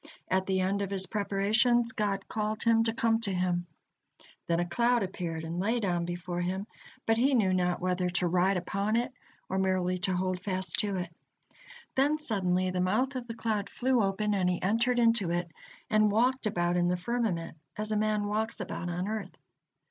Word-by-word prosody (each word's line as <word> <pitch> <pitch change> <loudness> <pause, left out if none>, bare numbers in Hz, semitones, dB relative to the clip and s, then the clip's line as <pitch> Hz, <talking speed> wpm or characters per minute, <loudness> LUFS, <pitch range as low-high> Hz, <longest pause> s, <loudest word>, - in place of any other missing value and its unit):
At 190 0 +1
the 190 -1 +1
end 195 +2 0
of 200 - -2
his 195 -1 -1
preparations, 220 +4 +2
God 205 -3 -2
called 215 0 -2
him 230 -1 +4
to 225 - +2
come 225 0 +1
to 215 -4 +2
Him. 180 -1 0 0.8
Then 170 0 +1
a 175 - +1
cloud 235 +5 +2
appeared 170 -4 -4
and 165 +2 -4
lay 225 +6 +1
down 175 -5 0
before 175 0 -4
him, 190 +3 -2 0.4
but 225 0 +2
he 265 +3 +3
knew 195 -6 +3
not 180 -1 +1
whether 180 0 0
to 180 0 +1
ride 185 +2 +2
upon 200 +4 -1
it 245 +3 0 0.3
or 190 - -1
merely 185 -1 +1
to 185 +1 0
hold 185 0 -1
fast 185 0 -1
to 205 -2 0
it. 175 -2 -4 0.8
Then 285 +3 +2
suddenly 185 -9 0
the 180 0 -1
mouth 240 +9 +1
of 250 -2 -4
the 230 - -6
cloud 215 -4 -2
flew 255 -1 +1
open, 205 +1 0
and 185 -3 +2
he 180 - 0
entered 230 +6 +2
into 230 -6 +4
it, 175 0 -2 0.4
and 215 -1 +3
walked 245 +3 +2
about 175 -3 0
in 175 0 +2
the 180 0 +1
firmament 180 -5 -2 0.2
as 215 0 -3
a - - +1
man 210 0 +1
walks 215 +2 -2
about 175 - -4
on 180 +2 -2
earth. 210 -3 -4
195 Hz, 195 wpm, -29 LUFS, 180-225 Hz, 0.8 s, him